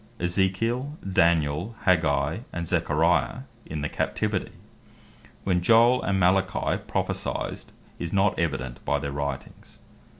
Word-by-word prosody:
Ezekiel, 115 - 0
Daniel, 85 +1 +2
Aggeus, 80 -2 +2
and 85 0 -4
Zacharias, 80 -5 +1 0.2
in 75 -1 -4
the 75 - -1
Captivity. - - -2 0.9
When 90 -2 +1
Joel 115 +6 +5
and 95 -1 0
Malachi 95 +1 +1
prophecyed, - - -3 0.3
is 85 -1 -4
not 100 0 +2
evident 65 -7 -2
by 75 - +1
their 70 -1 -4
Writings. 70 0 -6
85 Hz, 110 wpm, -26 LUFS, 75-95 Hz, 0.9 s, Joel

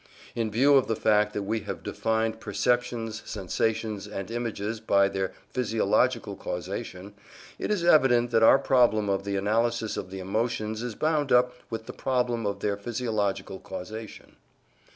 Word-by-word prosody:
In 115 -2 -1
view 135 +6 +5
of 130 - +2
the 115 - 0
fact 105 -1 +3
that 105 - -2
we 110 +3 -1
have - - -6
defined 110 0 -1
perceptions, 115 +1 -1
sensations, 105 +1 -2
and 100 0 -6
images 115 -2 -3
by 100 -3 +3
their 95 -1 -2 0.2
physiological 115 -1 +1
causation, 95 +2 -6 0.5
it - - -3
is 205 -5 0
evident 125 -8 +4
that 115 -1 +3
our 115 - +8
problem 120 -6 +3
of 100 0 -1
the 100 -1 -2
analysis 110 +3 0
of - - -5
the 95 - -7
emotions 110 +2 -2
is 120 -3 -4
bound 155 -2 0
up 125 0 +4 0.2
with 115 -1 -5
the - - -8
problem 120 -4 0
of 100 0 -3
their 100 -1 0
physiological 100 -4 -2
causation. 110 +4 -8
110 Hz, 155 wpm, -27 LUFS, 100-120 Hz, 0.5 s, our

